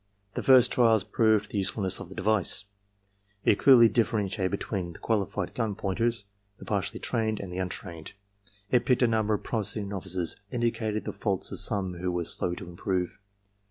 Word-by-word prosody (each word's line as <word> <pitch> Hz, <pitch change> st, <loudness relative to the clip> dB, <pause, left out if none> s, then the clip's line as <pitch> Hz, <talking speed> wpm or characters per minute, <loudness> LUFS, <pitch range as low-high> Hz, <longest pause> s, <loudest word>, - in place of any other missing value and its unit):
"The -, -, -2 dB
first 130 Hz, -2 st, +6 dB
trials 115 Hz, -4 st, +4 dB
proved 110 Hz, -2 st, +2 dB
the 105 Hz, -, -1 dB
usefulness 95 Hz, 0 st, -1 dB
of -, -, -8 dB
the 95 Hz, -, -9 dB
device. 100 Hz, -1 st, +1 dB, 0.8 s
It 100 Hz, -, +4 dB
clearly 125 Hz, -4 st, +8 dB
differentiated 105 Hz, -4 st, 0 dB
between 95 Hz, -3 st, -3 dB
the -, -, -11 dB
qualified 100 Hz, -4 st, -1 dB
gun 110 Hz, -4 st, -2 dB
pointers, 110 Hz, +2 st, -1 dB, 0.3 s
the -, -, -11 dB
partially 105 Hz, +2 st, -2 dB
trained, 110 Hz, -3 st, -1 dB
and 95 Hz, -3 st, -6 dB
the 90 Hz, -, -3 dB
untrained. 90 Hz, -3 st, -5 dB, 0.6 s
It 120 Hz, -1 st, +4 dB
picked 125 Hz, 0 st, +2 dB
a -, -, +5 dB
number 110 Hz, -2 st, +1 dB
of -, -, -6 dB
promising 105 Hz, -2 st, -2 dB
novices 95 Hz, -3 st, -3 dB
and 120 Hz, -2 st, -2 dB
indicated 110 Hz, -2 st, -1 dB
the -, -, -4 dB
faults 100 Hz, -4 st, -1 dB
of -, -, -3 dB
some 95 Hz, -4 st, -1 dB
who 90 Hz, 0 st, -1 dB
were 90 Hz, -1 st, -2 dB
slow 85 Hz, +2 st, 0 dB
to 95 Hz, -1 st, -9 dB
improve. 90 Hz, +1 st, -3 dB
105 Hz, 180 wpm, -28 LUFS, 95-115 Hz, 0.8 s, clearly